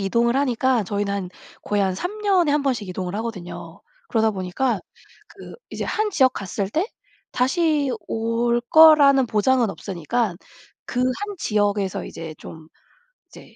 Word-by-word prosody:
이동을 235 +5 +1
하니까 260 -4 +1
저희는 200 +1 -2
한 195 -3 -3 0.3
거의 205 -1 0
한 190 -1 0
3 410 - -5
년에 370 -7 +2
1 295 -1 +1
번씩 235 -8 -1
이동을 180 0 -4
하거든요. 215 -6 -7 0.3
그러다 220 -2 +2
보니까 195 +3 -2 0.5
그 - - -12 0.2
이제 - - -4
1 430 -1 -1
지역 260 -8 +3
갔을 195 -1 -4
때 320 - -1 0.5
다시 290 +2 +1 0.2
올 230 +1 0
거라는 285 -2 +6
보장은 230 +1 +2
없으니깐 195 +2 -3 0.5
그 245 - -3
1 390 +12 -2
지역에서 205 -2 0
이제 160 -1 -8
좀 160 -1 -11 0.6
이제 - - -15
235 Hz, 270 characters per minute, -22 LUFS, 200-275 Hz, 0.6 s, 거라는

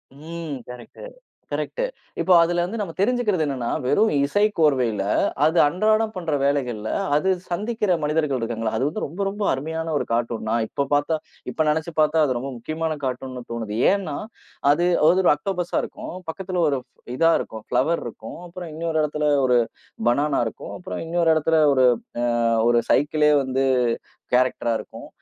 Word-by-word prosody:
ம். 160 0 -6
Correct, 125 - -10 0.5
correct - - -2 0.4
இப்போ 185 - +4
அதுல 175 +1 +2
வந்து 220 +5 -5
நம்ம 170 -5 -4
தெரிஞ்சுக்கிறது 210 -5 +1
என்னன்னா, 130 -4 -2 0.2
வெறும் 210 +12 +3
இசைக்கோர்வையில 145 - +2 0.4
அது 160 +2 +2
அன்றாடப் 215 +7 +2
பண்ற 170 -4 -3
வேலைகள்ல, 125 -6 -1 0.3
அது 150 +6 +2 0.2
சந்திக்கிற 210 +3 -1
மனிதர்கள் 150 -3 0
இருக்காங்கள, 115 -1 -2
அது - - 0
வந்து 180 +8 -3
ரொம்ப 170 +7 -6
ரொம்ப 205 +1 -4
அருமையான 160 +4 -3
ஒரு - - -2
கார்ட்டூன். 115 -1 -1
நான் 115 0 +1
இப்போ 140 - -2
பாத்தா 145 +2 +2 0.3
இப்போ 160 - 0
நெனைச்சு 160 +2 -1
பாத்தா 155 +1 +3
அது 130 -4 0
ரொம்ப 135 +2 -4
முக்கியமான 155 +5 -3
கார்ட்டூன்ன்னு 130 -1 -4
தோணுது. 115 -3 -4 0.2
ஏன்னா, 200 -1 -1 0.6
அது 175 +4 +2 0.2
ஒரு 185 +1 +4
ஆக்டோபஸா 180 0 -3
இருக்கும். - - -7 0.2
பக்கத்துல 185 +1 -3
ஒரு 140 -2 0 0.4
இதா 165 +3 +4
இருக்கும், 110 -1 -7
பிலோவேர் 135 +7 +1
இருக்கும். 115 +3 -9
அப்புறம் 175 -1 -8
இன்னொரு 160 0 -1
இடத்துல 150 0 -1 0.2
ஒரு 125 -1 +4 0.5
பனானா 140 +3 +1
இருக்கும். - - -8
அப்புறம் 180 - -6
இன்னொரு 165 0 +2
இடத்துல 160 +1 +2 0.2
ஒரு 130 -1 +4 0.4
அ - - +2 0.4
ஒரு 120 0 +4
சைக்கிள்லே 150 +1 +3
வந்து 130 +1 0 0.7
கேரக்டரா 125 -1 +2
இருக்கும். - - -10
155 Hz, 150 wpm, -23 LUFS, 130-175 Hz, 0.7 s, இப்போ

